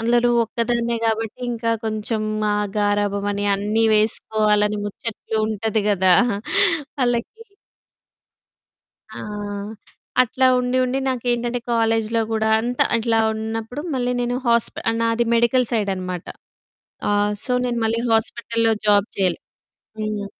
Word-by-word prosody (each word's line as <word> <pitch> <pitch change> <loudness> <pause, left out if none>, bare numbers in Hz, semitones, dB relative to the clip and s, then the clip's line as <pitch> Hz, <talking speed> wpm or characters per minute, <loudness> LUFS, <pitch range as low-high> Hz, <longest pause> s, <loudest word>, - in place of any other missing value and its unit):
అందులో 240 +1 +3 0.2
ఒక్కదాన్నే 235 +1 -1
గాబట్టి, 225 +1 -1
ఇంకా 230 -1 -1
కొంచెం 215 0 -2 0.3
ఆ - - +1 0.2
గారాబం 205 -1 +1
అని, 200 0 -2
అన్నీ 210 +3 0
వేసుకోవాలని 210 -1 +1
ముచ్చట్లు 220 +2 -5
ఉంటది 220 0 -1
గదా! 190 -2 +4 0.9
వాళ్ళకి. 245 - 0 1.8
ఆ! - - -7 1.0
అట్లా 255 +2 +1
ఉండి, 250 +1 0
ఉండి 255 +2 0
నాకేంటంటే 240 -1 -1
కాలేజిలో 225 0 +1
గూడా 220 0 +1
అంతా 245 +2 +1
అట్లా 225 0 +1 0.2
ఉన్నప్పుడు, 225 +5 -4
మళ్ళీ 250 0 0
నేను 245 +1 -1
హాస్ప 235 -1 +2 0.3
నాది 230 +1 +1
మెడికల్ 235 +1 +2
సైడ్ 215 -4 0
అనమాట. 185 -1 -5 0.9
ఆహ్, 205 0 +2
సో, 250 - -2
నేను 240 -1 -1
మళ్ళీ 225 +1 0
హాస్పిటల్‌లో 225 0 +1
జాబ్ 205 0 +4
చేయాలి. 185 -3 +1 0.6
హ్మ్. 215 -1 -3
225 Hz, 115 wpm, -21 LUFS, 210-235 Hz, 1.8 s, గదా